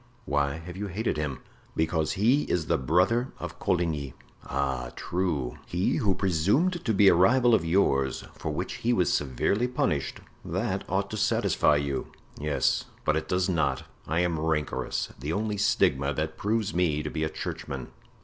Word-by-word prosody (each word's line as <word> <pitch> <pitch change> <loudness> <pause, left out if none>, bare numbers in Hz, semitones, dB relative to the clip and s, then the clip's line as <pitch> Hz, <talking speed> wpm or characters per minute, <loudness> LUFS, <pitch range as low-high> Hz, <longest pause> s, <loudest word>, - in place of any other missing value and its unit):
"Why 70 -1 +1
have 85 +2 -8
you 100 +2 -4
hated 100 0 -2
him?" 75 -3 -3 0.3
"Because 80 -1 +1
he 125 +9 +3
is 85 -3 +1
the 85 -2 +1
brother 90 - +2
of - - -7
Coligny." 80 -7 -1 0.3
"Ah, 65 -2 -2
true! 80 -9 -2
he 90 +2 0
who 105 -9 +2
presumed 105 - +1
to 115 - +1
be 100 -1 +5
a - - +8
rival 120 +8 +5
of 110 - +4
yours, 70 -7 +2
for - - -5
which 75 - -3
he 120 +2 +1
was 90 -8 +2
severely 85 - +1
punished; 75 - -1 0.2
that - - -2
ought - - 0
to - - -3
satisfy 75 - +3
you." 70 -2 -1 0.3
"'Yes, 75 0 +1 0.2
but 75 - +3
it 80 0 -2
does 90 0 +1
not; 80 -7 0 0.2
I 85 +2 +1
am 85 -3 0
rancorous—the 75 -2 -2
only 105 +3 -1
stigma 70 -8 +2
that 80 0 -2
proves 110 0 -1
me 80 -4 +1
to 75 - -4
be 80 - -2
a 80 - 0
churchman. - - -5
85 Hz, 170 wpm, -27 LUFS, 75-100 Hz, 0.3 s, a